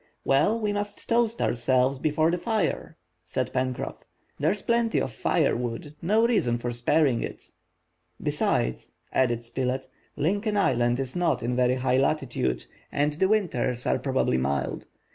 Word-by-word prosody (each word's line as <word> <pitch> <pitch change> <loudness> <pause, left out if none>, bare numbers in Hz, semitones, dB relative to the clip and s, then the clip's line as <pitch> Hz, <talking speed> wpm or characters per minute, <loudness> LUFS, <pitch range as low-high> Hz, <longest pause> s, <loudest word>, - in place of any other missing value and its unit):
"Well, 155 +12 +3
we 210 -2 0
must 205 0 -4
toast 230 -1 +2
ourselves 130 +2 +2
before 155 +2 +2
the 175 - -1
fire!" 215 -2 -1 0.3
said - - -3
Pencroff." 130 -1 -2 0.4
There's 205 - +1
plenty 235 -1 +1
of 130 - -2
fire - - +1
wood, 125 +6 -4
no 215 +6 +3
reason 165 - +2
for 120 0 -3
sparing 120 +2 +2
it." - - -7 0.7
"Besides," - - -1 0.2
added 120 -2 +2
Spilett, 130 +2 -2 0.3
"Lincoln 205 +8 0
Island 120 -9 +2
is 130 -1 -4
not 175 -7 +1
in 120 +1 -1
very 125 0 +3
high 130 0 +1
latitude, 130 - 0 0.3
and 145 +1 +1
the 180 +5 +2
winters 130 - 0
are - - +1
probably 130 - +1
mild. 70 +2 -2
135 Hz, 145 wpm, -26 LUFS, 120-190 Hz, 0.7 s, Well